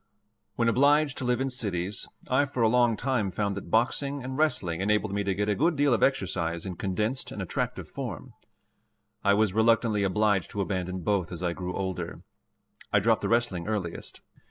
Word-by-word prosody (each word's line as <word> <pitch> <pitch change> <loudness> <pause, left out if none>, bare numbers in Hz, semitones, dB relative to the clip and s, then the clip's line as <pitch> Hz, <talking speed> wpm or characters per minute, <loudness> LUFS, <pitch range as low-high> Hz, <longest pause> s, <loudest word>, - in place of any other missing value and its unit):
When 115 - +1
obliged 145 +4 +4
to 130 - -3
live 125 0 +1
in 135 0 -1
cities, 100 -6 -1 0.2
I 130 +3 +3
for 130 -4 -2
a - - +6
long 120 -1 +3
time 125 -6 0
found 100 +2 -2
that 100 - -7
boxing 140 +4 +1
and 130 +1 -5
wrestling 95 - 0
enabled 105 0 +1
me 100 0 0
to 100 -1 -1
get 105 +1 -1
a 105 - +2
good 165 - +2
deal 145 -2 +3
of 115 - +1
exercise 85 -9 0
in 95 -2 -4
condensed 105 +8 -2
and - - -7
attractive - - -3
form. - - -6 0.9
I 100 0 +4
was 105 -2 +2
reluctantly 110 -1 +3
obliged 100 0 +1
to 100 - -3
abandon 95 -1 -2
both 95 -1 0
as 90 0 -6
I 85 -1 0
grew 90 0 -5
older. 95 -2 -4 0.7
I - - +5
dropped - - +2
the - - -1
wrestling 115 -7 +1
earliest. 100 -6 -4
105 Hz, 190 wpm, -27 LUFS, 95-125 Hz, 0.9 s, a